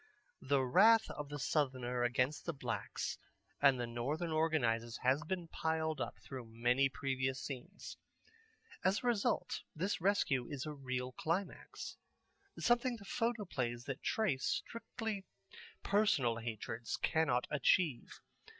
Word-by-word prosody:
The 135 Hz, 0 st, +2 dB
wrath 220 Hz, -, +6 dB
of 150 Hz, -1 st, -6 dB
the 145 Hz, -, -4 dB
Southerner 130 Hz, -4 st, 0 dB
against 125 Hz, +4 st, +1 dB
the 170 Hz, -, -1 dB
blacks -, -, -3 dB, 0.4 s
and 135 Hz, -3 st, +6 dB
their 120 Hz, -, 0 dB
Northern 135 Hz, +8 st, -2 dB
organizers 120 Hz, -8 st, +1 dB
has 130 Hz, +3 st, +3 dB
been 175 Hz, +1 st, -3 dB
piled 160 Hz, -2 st, -1 dB
up -, -, -3 dB
through 130 Hz, -4 st, -7 dB
many 120 Hz, +4 st, +2 dB
previous 130 Hz, -1 st, -1 dB
scenes. 145 Hz, +9 st, -7 dB, 0.9 s
As 195 Hz, +5 st, +2 dB
a -, -, -5 dB
result 235 Hz, -4 st, +1 dB
this 185 Hz, +4 st, -1 dB
rescue 165 Hz, -10 st, +2 dB
is 140 Hz, -3 st, -4 dB
a 155 Hz, -, -4 dB
real 130 Hz, -2 st, -3 dB
climax, 170 Hz, +8 st, -3 dB, 0.6 s
something 240 Hz, +1 st, +2 dB
the 200 Hz, -, -13 dB
photoplays 195 Hz, -, -1 dB
that 135 Hz, -1 st, -4 dB
trace 175 Hz, -12 st, +1 dB
strictly 225 Hz, -3 st, -4 dB, 0.6 s
personal 200 Hz, -, +3 dB
hatreds 115 Hz, 0 st, -4 dB
cannot 155 Hz, -6 st, +2 dB
achieve. 150 Hz, -1 st, +2 dB
145 Hz, 125 wpm, -36 LUFS, 125-185 Hz, 0.9 s, wrath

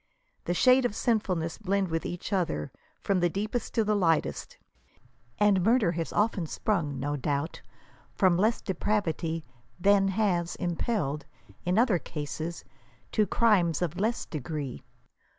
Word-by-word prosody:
The 175 Hz, -, 0 dB
shades 255 Hz, +4 st, +5 dB
of 210 Hz, -, -9 dB
sinfulness 185 Hz, -8 st, 0 dB
blend 200 Hz, -2 st, 0 dB
with 165 Hz, 0 st, -2 dB
each 175 Hz, +4 st, -5 dB
other, 165 Hz, -, -1 dB, 0.3 s
from 195 Hz, -2 st, +1 dB
the 175 Hz, 0 st, +2 dB
deepest 210 Hz, +6 st, -3 dB
to 225 Hz, -, +3 dB
the 210 Hz, 0 st, +1 dB
lightest; 165 Hz, -, 0 dB, 0.8 s
and 205 Hz, -2 st, +4 dB
murder 225 Hz, -4 st, +4 dB
has 165 Hz, -1 st, -3 dB
often 205 Hz, -5 st, +1 dB
sprung, 155 Hz, -7 st, -1 dB
no 145 Hz, +2 st, -1 dB
doubt, 145 Hz, +3 st, -2 dB, 0.5 s
from 185 Hz, -3 st, +4 dB
less 215 Hz, +6 st, +2 dB
de 190 Hz, -, -2 dB
pravity 165 Hz, -4 st, -1 dB, 0.4 s
than, 195 Hz, +1 st, +4 dB
has 190 Hz, -4 st, 0 dB
impelled, 165 Hz, -5 st, -2 dB, 0.4 s
in 180 Hz, +2 st, +1 dB
other 225 Hz, -6 st, +4 dB
cases, 155 Hz, +2 st, -5 dB, 0.5 s
to 210 Hz, -1 st, +2 dB
crithes 180 Hz, -8 st, +3 dB
of 175 Hz, +1 st, -3 dB
less 225 Hz, +4 st, 0 dB
degree. 145 Hz, -, -5 dB
180 Hz, 140 wpm, -28 LUFS, 165-210 Hz, 0.8 s, shades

